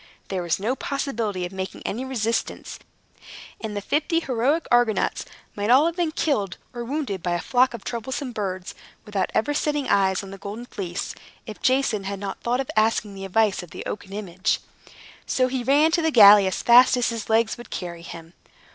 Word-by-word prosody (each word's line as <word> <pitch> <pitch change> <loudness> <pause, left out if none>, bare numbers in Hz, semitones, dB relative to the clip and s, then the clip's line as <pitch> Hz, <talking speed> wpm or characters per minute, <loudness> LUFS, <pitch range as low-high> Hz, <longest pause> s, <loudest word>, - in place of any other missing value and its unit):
There 190 -2 -2
was 170 0 -1
no 225 +7 -1
possibility 230 -10 -2
of 175 - -7
making 190 0 -6
any 235 +6 -3
resistance; 235 -3 -3 0.8
and 210 -2 -4
the - - -2
fifty 315 - +1
heroic 275 +3 0
Argonauts 240 -3 +2 0.3
might 205 +1 -2
all 265 +5 +6
have 335 0 0
been 345 -3 0
killed 210 - -1 0.2
or 240 -1 -5
wounded 250 - -3
by 175 +1 -1
a 175 - 0
flock 250 +5 +2
of 215 - -10
troublesome 255 +3 -4
birds, 190 -4 -4 0.3
without 200 -3 -1
ever 265 +7 +1
setting 295 -1 -1
eyes 190 0 +2
on 195 - -9
the 195 - -9
Golden 210 +5 -7
Fleece, 190 -5 -5 0.3
if 215 -3 -9
Jason 255 -6 +1
had 200 0 -3
not 195 -1 -6
thought 245 +2 0
of 270 - -3
asking 215 -1 +1
the 195 0 -7
advice 210 +1 +1
of 175 - -11
the - - -8
oaken 195 -2 -6
image. 190 -3 -1 0.7
So 255 -1 +2
he 255 0 -2
ran 290 +5 +4
to 340 - +2
the 320 - +2
galley 205 -6 +8
as 190 - -2
fast 245 +2 +7
as 245 - +1
his 230 -2 -5
legs 225 0 +2
would 240 - -11
carry 170 -2 -6
him. 165 0 -10
220 Hz, 195 wpm, -24 LUFS, 195-260 Hz, 0.8 s, galley